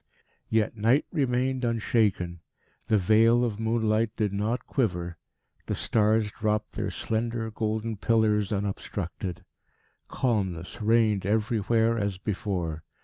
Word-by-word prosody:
Yet 110 Hz, 0 st, +1 dB
Night 115 Hz, +7 st, +3 dB
remained 130 Hz, -3 st, 0 dB
unshaken; 105 Hz, -6 st, +1 dB, 0.5 s
the 110 Hz, -, +4 dB
veil 115 Hz, +5 st, +4 dB
of 110 Hz, -3 st, -3 dB
moonlight 110 Hz, 0 st, +1 dB
did 105 Hz, -3 st, 0 dB
not 105 Hz, +5 st, -1 dB
quiver; 90 Hz, -, -1 dB, 0.5 s
the -, -, -1 dB
stars 110 Hz, -1 st, +2 dB
dropped 105 Hz, 0 st, -1 dB
their -, -, -3 dB
slender 115 Hz, 0 st, -2 dB
golden 110 Hz, 0 st, -2 dB
pillars 105 Hz, -1 st, +2 dB
unobstructed. 95 Hz, -3 st, -4 dB, 0.6 s
Calmness 95 Hz, -8 st, -2 dB
reigned 110 Hz, -3 st, +3 dB
everywhere 115 Hz, +1 st, +1 dB
as 100 Hz, -2 st, -1 dB
before. 90 Hz, -6 st, -3 dB
110 Hz, 110 wpm, -27 LUFS, 100-115 Hz, 0.6 s, the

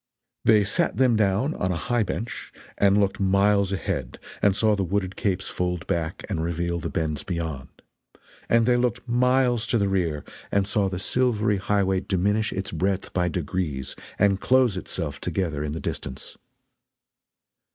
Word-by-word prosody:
They 110 Hz, -2 st, +6 dB
sat 100 Hz, +1 st, 0 dB
them 125 Hz, -2 st, +4 dB
down 110 Hz, +7 st, +2 dB
on 95 Hz, -, -1 dB
a -, -, -1 dB
high 120 Hz, +9 st, 0 dB
bench 110 Hz, +4 st, -4 dB, 0.2 s
and 100 Hz, 0 st, +4 dB
looked 100 Hz, -1 st, +1 dB
miles 100 Hz, 0 st, +3 dB
ahead 70 Hz, -9 st, -3 dB, 0.2 s
and 100 Hz, -2 st, +4 dB
saw 110 Hz, 0 st, +3 dB
the 100 Hz, -, -1 dB
wooded 95 Hz, +1 st, -1 dB
capes 95 Hz, -2 st, -1 dB
fold 90 Hz, -1 st, -2 dB
back 80 Hz, -1 st, -2 dB
and 80 Hz, -, -2 dB
reveal 85 Hz, +1 st, -1 dB
the -, -, -4 dB
bends 80 Hz, -3 st, -2 dB
beyond; 80 Hz, -7 st, -4 dB, 0.8 s
and 115 Hz, -1 st, +4 dB
they 125 Hz, 0 st, +4 dB
looked 120 Hz, 0 st, -1 dB
miles 125 Hz, -1 st, +2 dB
to 115 Hz, -, +2 dB
the 100 Hz, -2 st, +1 dB
rear 85 Hz, -6 st, 0 dB, 0.3 s
and 100 Hz, -1 st, +2 dB
saw 100 Hz, -2 st, +1 dB
the 95 Hz, -, -4 dB
silvery 105 Hz, 0 st, +1 dB
highway 95 Hz, -1 st, +1 dB
diminish 105 Hz, +3 st, 0 dB
its 95 Hz, 0 st, -4 dB
breadth 95 Hz, +4 st, -1 dB
by 90 Hz, -1 st, +1 dB
degrees 80 Hz, -5 st, -3 dB, 0.2 s
and 100 Hz, -1 st, +3 dB
close 130 Hz, -5 st, +3 dB
itself 85 Hz, -5 st, -4 dB
together 80 Hz, -4 st, -2 dB
in 75 Hz, -, -3 dB
the 80 Hz, -, -4 dB
distance. 65 Hz, -, -5 dB
95 Hz, 160 wpm, -25 LUFS, 85-105 Hz, 0.8 s, They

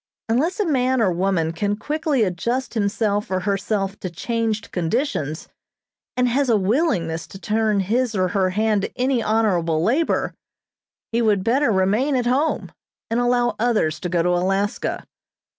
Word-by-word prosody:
Unless 305 Hz, -, 0 dB
a 415 Hz, -, +2 dB
man 260 Hz, -4 st, +1 dB
or 205 Hz, -5 st, +3 dB
woman 175 Hz, -2 st, 0 dB
can 205 Hz, +5 st, -1 dB
quickly 295 Hz, +2 st, 0 dB
adjust 235 Hz, +8 st, -2 dB
himself 205 Hz, -1 st, 0 dB
or 185 Hz, -1 st, -1 dB
herself 195 Hz, 0 st, -1 dB
to 185 Hz, -, -4 dB
changed 225 Hz, +4 st, -2 dB
conditions, 170 Hz, -, -2 dB, 0.7 s
and 250 Hz, 0 st, +3 dB
has 265 Hz, +2 st, +1 dB
a 225 Hz, -, +4 dB
willingness 190 Hz, -, 0 dB
to -, -, -10 dB
turn 215 Hz, -1 st, +1 dB
his 230 Hz, +4 st, 0 dB
or 185 Hz, -1 st, +1 dB
her 190 Hz, 0 st, +1 dB
hand 210 Hz, +2 st, +1 dB
to 200 Hz, -, -5 dB
any 255 Hz, -1 st, +1 dB
honorable 180 Hz, -8 st, +1 dB
labor, 275 Hz, -, +1 dB, 0.8 s
he 230 Hz, +1 st, +1 dB
would 210 Hz, -4 st, +2 dB
better 260 Hz, +5 st, +2 dB
remain 210 Hz, +9 st, +2 dB
at 250 Hz, -2 st, 0 dB
home, 270 Hz, +6 st, 0 dB, 0.4 s
and 230 Hz, -, +1 dB
allow 245 Hz, 0 st, +2 dB
others 215 Hz, -10 st, +1 dB
to 180 Hz, -, -4 dB
go 170 Hz, -1 st, +1 dB
to 180 Hz, -, +1 dB
Alaska. 195 Hz, +3 st, 0 dB
215 Hz, 160 wpm, -22 LUFS, 185-245 Hz, 0.8 s, a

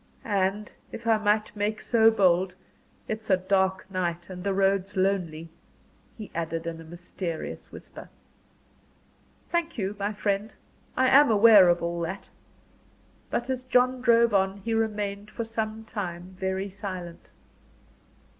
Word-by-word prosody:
"And 205 Hz, 0 st, -1 dB, 0.2 s
if 230 Hz, -, -8 dB
I 225 Hz, -1 st, +3 dB
might 215 Hz, 0 st, +1 dB
make 210 Hz, +1 st, -1 dB
so 225 Hz, -2 st, +4 dB
bold 185 Hz, -4 st, +2 dB, 0.5 s
it's 220 Hz, 0 st, -5 dB
a 190 Hz, -, +5 dB
dark 190 Hz, 0 st, 0 dB
night 175 Hz, -1 st, -3 dB
and 180 Hz, -1 st, -7 dB
the 200 Hz, -, 0 dB
road's 195 Hz, 0 st, +1 dB
lonely 175 Hz, -4 st, -1 dB, 0.3 s
" -, -, -34 dB
he 215 Hz, -2 st, -9 dB
added, 165 Hz, 0 st, -3 dB
in 165 Hz, -1 st, -5 dB
a -, -, -10 dB
mysterious 170 Hz, 0 st, -6 dB
whisper. -, -, -11 dB, 1.4 s
"Thank 340 Hz, -2 st, -1 dB
you, 200 Hz, -1 st, -2 dB
my 200 Hz, +1 st, -1 dB
friend. 205 Hz, +1 st, -2 dB, 0.4 s
I 260 Hz, -, +4 dB
am 285 Hz, +1 st, +7 dB
aware 210 Hz, -3 st, +7 dB
of 175 Hz, 0 st, +2 dB
all 170 Hz, 0 st, -2 dB
that." 170 Hz, +4 st, -5 dB, 1.0 s
But 240 Hz, -, -2 dB
as 255 Hz, -1 st, -3 dB
John 255 Hz, 0 st, +2 dB
drove 235 Hz, -2 st, +4 dB
on, 195 Hz, 0 st, +2 dB
he 230 Hz, -, -1 dB
remained 210 Hz, -2 st, -2 dB
for 230 Hz, -, -4 dB
some 220 Hz, -1 st, -4 dB
time 185 Hz, -4 st, -6 dB
very 190 Hz, +1 st, -2 dB
silent. 185 Hz, -4 st, -7 dB
200 Hz, 145 wpm, -26 LUFS, 185-220 Hz, 1.4 s, am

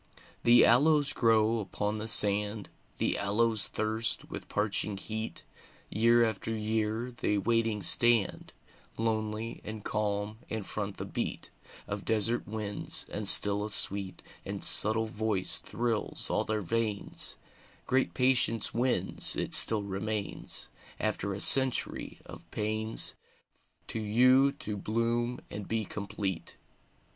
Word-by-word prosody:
The 120 Hz, +1 st, +4 dB
aloes 145 Hz, +4 st, +3 dB
grow 115 Hz, -1 st, 0 dB
upon 105 Hz, +1 st, -5 dB
the 110 Hz, -, -7 dB
sand, 105 Hz, -1 st, +3 dB, 0.3 s
The -, -, -3 dB
aloes 110 Hz, +2 st, 0 dB
thirst 110 Hz, +1 st, -3 dB
with -, -, -8 dB
parching 105 Hz, -1 st, -3 dB
heat; 110 Hz, +3 st, -6 dB, 0.5 s
Year 115 Hz, +2 st, +2 dB
after 110 Hz, -1 st, -5 dB
year 110 Hz, +2 st, -4 dB
they 110 Hz, -3 st, -3 dB
waiting 115 Hz, 0 st, -2 dB
stand, 120 Hz, -4 st, +3 dB, 0.5 s
Lonely 110 Hz, 0 st, -5 dB
and 110 Hz, -1 st, -10 dB
calm, 105 Hz, 0 st, -4 dB
and 110 Hz, -3 st, -6 dB
front 100 Hz, -1 st, -6 dB
the -, -, -7 dB
beat -, -, -5 dB, 0.4 s
Of -, -, -7 dB
desert 110 Hz, +2 st, 0 dB
winds; 105 Hz, -1 st, +3 dB
and 105 Hz, -1 st, -4 dB
still 100 Hz, +1 st, +8 dB
a 105 Hz, -, -6 dB
sweet 100 Hz, -2 st, +1 dB, 0.2 s
And -, -, -7 dB
subtle 110 Hz, +1 st, +5 dB
voice 110 Hz, -3 st, 0 dB
thrills 115 Hz, -3 st, -2 dB
all -, -, -2 dB
their 110 Hz, -1 st, -4 dB
veins: 110 Hz, +2 st, -2 dB, 0.5 s
"Great 130 Hz, +1 st, -2 dB
patience 125 Hz, -4 st, +1 dB
wins; 120 Hz, -6 st, +3 dB
it -, -, -4 dB
still 110 Hz, -2 st, +7 dB
remains, 100 Hz, +1 st, -3 dB, 0.3 s
After 100 Hz, -, -3 dB
a -, -, -8 dB
century 130 Hz, +3 st, +1 dB
of -, -, -14 dB
pains, 110 Hz, +1 st, -1 dB, 0.8 s
To -, -, -5 dB
you 130 Hz, +6 st, +2 dB
to 105 Hz, -7 st, -8 dB
bloom 115 Hz, +3 st, -4 dB
and 105 Hz, -2 st, -9 dB
be 110 Hz, -1 st, -4 dB
complete." 100 Hz, -3 st, -7 dB
110 Hz, 125 wpm, -27 LUFS, 105-115 Hz, 0.8 s, still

